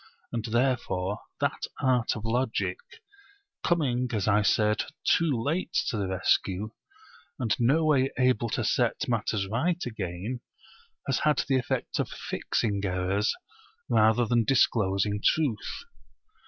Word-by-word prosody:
And 115 -2 -3
therefore 115 -5 0 0.2
that - - -1
art 125 -2 +2
of 110 -1 -6
Logic, 120 - -1 0.8
coming 130 -7 +1
(as 105 -2 -1
I 105 0 +4
said) 105 +1 +2 0.2
too 165 0 +3
late 155 +10 -2 0.2
to 115 - -2
the 100 -2 -1
rescue, 95 +2 0 0.7
and 120 -5 0
no 140 +7 +3
way 135 -3 +3
able 125 -3 +2
to - - -1
set - - +1
matters 110 -4 0
right 160 - 0
again, 105 +1 -4 0.6
has - - 0
had 150 -2 +2
the 135 -1 +3
effect - - -2
of - - -1
fixing 100 -3 -2
errors 95 +3 0 0.6
rather 110 +2 +4
than 120 +1 +2
disclosing 105 -4 +2
truth. 135 -10 0
115 Hz, 125 wpm, -27 LUFS, 105-130 Hz, 0.8 s, I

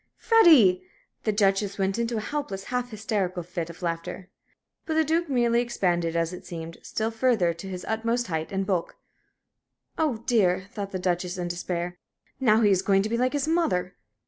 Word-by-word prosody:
"Freddie!" 300 - +6 0.4
The 215 - +3
Duchess 200 -1 +1
went 195 +2 0
into 235 0 -1
a - - -1
helpless, 215 -8 -4
half 250 0 -1
hysterical 200 -5 -2
fit 170 -1 -5
of 170 +2 -11
laughter. 170 +2 -4 0.6
But 320 - -1
the 320 - +4
Duke 325 +2 0
merely 240 -2 +2
expanded, 175 -8 0
as 165 +1 0
it 180 - -8
seemed, 165 -1 -8
still 220 +1 -2
further 225 -7 +2
to 170 +4 -9
his 180 -1 -6
utmost 230 +2 0
height 160 -5 -3
and 195 0 -1
bulk. 185 -4 -1 1.0
"Oh, 265 -8 0
dear," 190 -6 +2
thought 205 -4 -5
the 185 - -2
Duchess, 180 0 -1
in 175 -1 -3
despair, 175 0 -4 0.4
"now 225 -4 +4
he 205 -2 +4
is 185 -1 +3
going 195 0 +3
to 215 - -2
be 235 - 0
like 255 +2 +1
his 290 0 0
mother!" 195 - 0
195 Hz, 185 wpm, -26 LUFS, 180-235 Hz, 1.0 s, Freddie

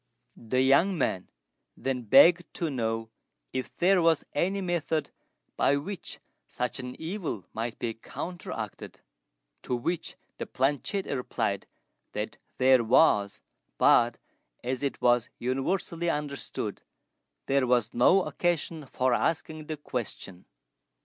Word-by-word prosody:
The 130 +3 0
young 170 +8 +4
men 95 - -1 0.5
then 130 0 -2
begged 155 - +6
to 165 -3 -1
know 115 -3 -2 0.4
if 130 0 -4
there 180 +1 +4
was 165 -2 +3
any 185 +7 +1
method 170 -4 -1 0.4
by 140 - +3
which 185 +6 -6 0.3
such 125 +2 -3
an 125 -1 -7
evil 160 - -4
might 115 +1 -3
be 115 -1 -2
counteracted; 115 - -7 0.6
to 125 - -2
which 165 +8 -3 0.2
the - - -4
planchette 145 +9 0
replied 125 -2 -2 0.5
that - - -4 0.2
there 130 -1 +5
was, 110 -4 +4 0.4
but, 120 -1 +5 0.5
as 125 0 -2
it 140 -1 -2
was 120 -2 +4
universally 165 +7 -1
understood, 145 -3 -3 0.6
there 135 -2 +2
was 120 -3 +2
no 180 +11 +5
occasion 165 -4 -1
for 130 0 +1
asking 155 +2 -1
the 155 - -4
question. 110 -9 -5
135 Hz, 120 wpm, -28 LUFS, 120-165 Hz, 0.6 s, begged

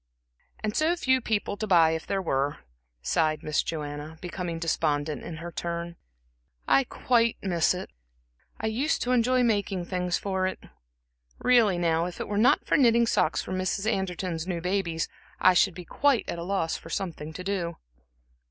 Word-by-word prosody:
"And 215 0 -2
so 320 +3 +2
few 260 -7 +2
people 210 -2 -1
to 215 - -3
buy 165 -4 +5
if 160 0 -3
there 195 -1 -1
were," 140 -2 0 0.5
sighed 155 - +1
Miss 155 0 +1
Joanna, 150 0 -5
becoming 175 -1 -4
despondent 155 -2 -1
in 170 - -7
her 170 +1 -7
turn. 170 0 -4 0.7
"I 275 - +4
quite 235 -2 +1
miss 175 -2 +2
it 185 - -7 0.7
I - - -3
used 245 +8 0
to 250 - -1
enjoy 250 +1 +3
making 200 -5 0
things 180 -1 -1
for 190 -1 -1
it. 185 - -3 0.8
Really 235 -7 +4
now, 165 -1 +1
if 180 - -8
it - - -3
were 205 0 -1
not 240 - +4
for - - +3
knitting 235 -3 +5
socks 165 -7 +1
for - - -8
Mrs. 185 +2 -1
Anderton's 185 -5 -2
new 175 -2 -2
babies, 175 -2 -1 0.3
I 185 - +6
should 180 0 +3
be 180 - -8
quite 275 - +2
at 170 - -4
a - - -4
loss 180 -3 -1
for 165 - -12
something 165 -4 -4
to 185 - -7
do." 180 -3 -2
180 Hz, 175 wpm, -27 LUFS, 165-215 Hz, 0.8 s, I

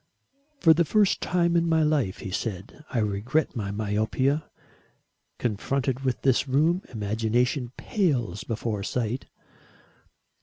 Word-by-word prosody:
"For 165 -2 +7
the 170 +2 +3
first 205 +4 +2
time 170 -1 +1
in 170 0 +2
my 160 -1 +3
life," 145 -11 0
he 95 - -5
said, 100 +7 -5
"I - - -3
regret 110 +8 0
my 105 -4 -3
myopia. 110 +8 0 0.9
Confronted 125 +4 -1
with 130 -2 -2
this 135 +1 +3
room, 155 +7 +2
imagination 115 +4 0
pales 125 - 0
before 110 -2 -3
sight." 120 +4 -2
125 Hz, 120 wpm, -26 LUFS, 110-155 Hz, 0.9 s, For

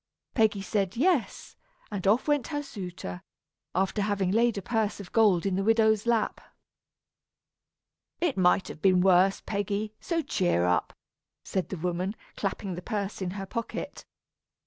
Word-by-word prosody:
Peggy 215 -4 +2
said 195 0 -1
"yes," 315 -2 0 0.4
and 195 -2 -3
off 220 +8 +3
went 290 -5 +2
her 290 -2 -3
suitor, 180 - -7 0.5
after 190 +3 +1
having 200 -2 0
laid 230 +1 +3
a - - -2
purse 220 -2 -1
of 200 - -9
gold 205 -6 +4
in 195 -2 +1
the 195 - 0
widow's 220 0 +3
lap. 230 -3 +1 1.8
"It 340 -6 +1
might 185 0 +3
have 155 - -9
been 185 -2 +4
worse, 190 +1 +4
Peggy, 205 +1 -2
so 330 -2 -1
cheer 180 - +1
up," 90 -3 +1 0.5
said 190 -2 -2
the 190 - -4
woman, 180 +4 -2 0.2
clapping 195 -1 -3
the 175 - -6
purse 205 -1 -3
in 185 - -1
her 195 - -4
pocket. 230 +4 -5
200 Hz, 150 wpm, -28 LUFS, 185-225 Hz, 1.8 s, gold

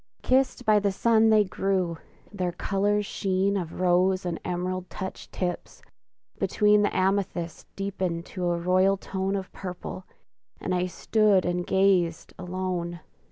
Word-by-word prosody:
Kissed 255 -1 +2
by 215 -1 +5
the 200 -1 +1
sun 225 +2 +3
they 215 -1 +6
grew; 185 -4 -1 0.3
their 180 -3 -1
colors' 205 +3 0
sheen 195 0 0
Of 175 -4 -4
rose 185 +1 +2
and 170 -2 -2
emerald 180 +1 -3
touched 190 0 -7
tips; 180 -1 -4 0.6
between 210 -1 +3
The 205 - 0
amethyst 185 -3 -1
deepened 185 -3 -3
to 180 -2 -3
a 170 - +1
royal 185 +3 +3
tone 190 0 -2
Of 190 -1 -5
purple, 185 0 -7 0.5
and 185 - -2
I 180 0 +1
stood 205 +1 +2
and 175 0 -1
gazed, 190 -4 +2
alone! 180 -2 -3
185 Hz, 140 wpm, -26 LUFS, 180-200 Hz, 0.6 s, they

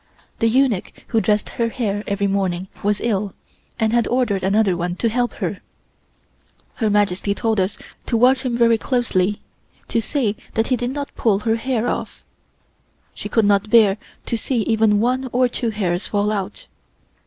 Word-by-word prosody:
The 230 - +3
eunuch 245 -5 +1 0.2
who 225 - +2
dressed 210 -1 +1
her 230 -1 -1
hair 210 -4 -2
every 200 0 0
morning 190 -2 -1
was 205 0 +1
ill, 205 -4 -1 0.4
and 220 0 +1
had 240 -1 +2
ordered 240 -6 +1
another 195 0 +2
one 175 +1 -2
to 230 +5 0
help 245 +2 0
her. - - -4 1.2
Her 220 -3 +1
Majesty 200 -1 +1
told 225 -2 0
us 190 +2 0 0.3
to 235 - +1
watch 255 +3 +4
him 250 -3 -1
very 230 -1 +4
closely 210 -6 0 0.5
to 230 - +1
see 225 -3 -1 0.2
that 225 0 +1
he 255 - +3
did 245 0 -2
not 285 +1 -5
pull 205 -3 +1
her 225 0 +1
hair 245 -1 -1
off. - - -4 0.9
She - - -6
could 225 -2 +2
not 200 +1 +2
bear 210 -3 +5 0.3
to 235 - -1
see 235 +1 -1
even 220 -2 +3
one 255 +2 0
or 250 +1 +3
two 240 -1 -2
hairs 185 -4 -1
fall 205 0 0
out. 210 - -4
220 Hz, 175 wpm, -21 LUFS, 200-240 Hz, 1.2 s, bear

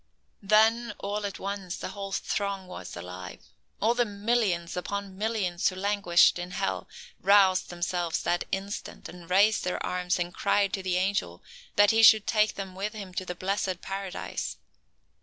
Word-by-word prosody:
Then, 220 +3 +3
all 205 +1 -3
at 200 - -7
once, 195 -2 -4
the - - -5
whole 195 0 -6
throng 200 -1 -2
was 180 - -8
alive. 90 +1 -8 0.3
All 225 +3 +3
the 245 0 +2
millions 205 -5 0
upon 200 +1 -4
millions 200 -4 0
who 185 - -8
languished 190 -3 +3
in 175 0 -5
hell, 190 +2 -2 0.3
roused 195 -1 +4
themselves 175 -1 -2
that 175 - 0
instant, 195 +2 -5
and 175 -1 -12
raised 205 +4 +4
their 180 - -2
arms 180 0 -1
and 175 0 -3
cried 200 0 +1
to 195 - -1
the 185 -1 0
angel 185 - -1 0.3
that 205 0 +6
he 225 0 +4
should 220 -1 +8
take 215 0 +2
them 195 -2 -6
with 200 +3 -4
him 200 -4 -8
to 185 - -3
the 180 - -5
blessed 185 -1 -2
Paradise. 195 -1 -5
195 Hz, 165 wpm, -28 LUFS, 180-205 Hz, 0.3 s, should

